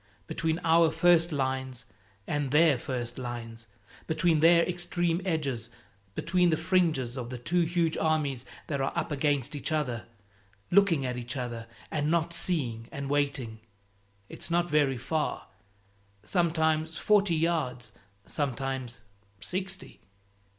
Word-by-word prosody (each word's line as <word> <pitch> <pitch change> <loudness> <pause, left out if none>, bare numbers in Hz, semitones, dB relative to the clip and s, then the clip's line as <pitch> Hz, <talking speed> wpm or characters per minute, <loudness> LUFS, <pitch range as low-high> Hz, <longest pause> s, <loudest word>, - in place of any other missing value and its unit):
Between 160 - -1
our 165 0 +5
first 165 +1 +4
lines 130 -3 -2 0.4
and 145 -2 -1
their 150 +1 +5
first 120 -1 -4
lines, 115 -2 -6 0.4
between 160 0 +2
their 170 +2 +6
extreme 175 -1 0
edges, 140 -10 -1 0.5
between 180 +1 +2
the 160 - +2
fringes 160 -8 +1
of 120 -1 -5
the 125 - -5
two 175 +9 +1
huge 170 -1 +1
armies 150 -6 0 0.2
that 140 -3 -2
are 135 - 0
up - - -2
against 145 -1 0
each 145 - -2
other, 130 -7 -1 0.6
looking 175 -7 +4
at 125 -1 -2
each 125 +2 -4
other 120 -2 -4 0.2
and 150 -1 0
not 170 0 +1
seeing, 130 -10 -1
and 140 0 -4
waiting 140 -6 -1 0.7
it's - - -8
not 175 +1 +1
very 145 -4 +3
far; 155 +5 -2 0.8
sometimes 160 - +1
forty 205 -4 +3
yards, 150 -9 -1 0.3
sometimes 130 -3 -3 0.4
sixty. 185 - -5
150 Hz, 130 wpm, -29 LUFS, 130-170 Hz, 0.8 s, their